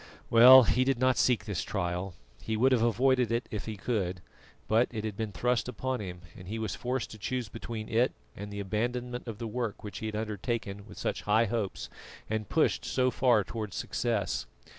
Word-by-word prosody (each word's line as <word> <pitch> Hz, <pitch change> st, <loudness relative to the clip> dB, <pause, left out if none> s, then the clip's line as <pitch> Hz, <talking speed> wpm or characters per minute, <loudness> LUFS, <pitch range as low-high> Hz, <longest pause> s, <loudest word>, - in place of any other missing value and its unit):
Well, 125 Hz, +3 st, +10 dB
he 125 Hz, +2 st, +2 dB
did 135 Hz, -1 st, +1 dB
not 130 Hz, +1 st, +3 dB
seek 120 Hz, -5 st, +2 dB
this 100 Hz, -5 st, -2 dB
trial 90 Hz, -1 st, -3 dB, 0.3 s
he 110 Hz, -1 st, -2 dB
would 130 Hz, +4 st, +4 dB
have 125 Hz, -3 st, +3 dB
avoided 125 Hz, +1 st, +3 dB
it 120 Hz, +1 st, -1 dB
if 105 Hz, 0 st, -4 dB
he 110 Hz, -2 st, -4 dB
could, 95 Hz, -5 st, -2 dB, 0.5 s
but 115 Hz, +3 st, +3 dB
it 110 Hz, -3 st, -5 dB
had 110 Hz, -2 st, -3 dB
been 110 Hz, 0 st, -3 dB
thrust 125 Hz, +7 st, 0 dB
upon 130 Hz, +2 st, -2 dB
him, 90 Hz, -3 st, -6 dB
and 90 Hz, -, -11 dB
he 110 Hz, +3 st, -4 dB
was 110 Hz, -3 st, -3 dB
forced 125 Hz, -1 st, -3 dB
to 110 Hz, -, -10 dB
choose 120 Hz, +1 st, -3 dB
between 115 Hz, 0 st, -6 dB
it 120 Hz, +3 st, +2 dB, 0.2 s
and 100 Hz, +1 st, -7 dB
the 100 Hz, -, -5 dB
abandonment 120 Hz, +5 st, -2 dB
of 115 Hz, -3 st, -5 dB
the 115 Hz, -, -5 dB
work 115 Hz, -1 st, -3 dB
which 105 Hz, -, -6 dB
he 110 Hz, -, -4 dB
had 110 Hz, -, -4 dB
undertaken 105 Hz, -1 st, -3 dB
with -, -, -12 dB
such -, -, -2 dB
high 110 Hz, +2 st, +5 dB
hopes 110 Hz, -2 st, -3 dB, 0.4 s
and 110 Hz, -2 st, -2 dB
pushed -, -, +2 dB
so 130 Hz, -1 st, +1 dB
far 120 Hz, -6 st, +3 dB
toward 105 Hz, +2 st, -5 dB
success. 115 Hz, -5 st, -1 dB
110 Hz, 205 wpm, -30 LUFS, 105-125 Hz, 0.5 s, Well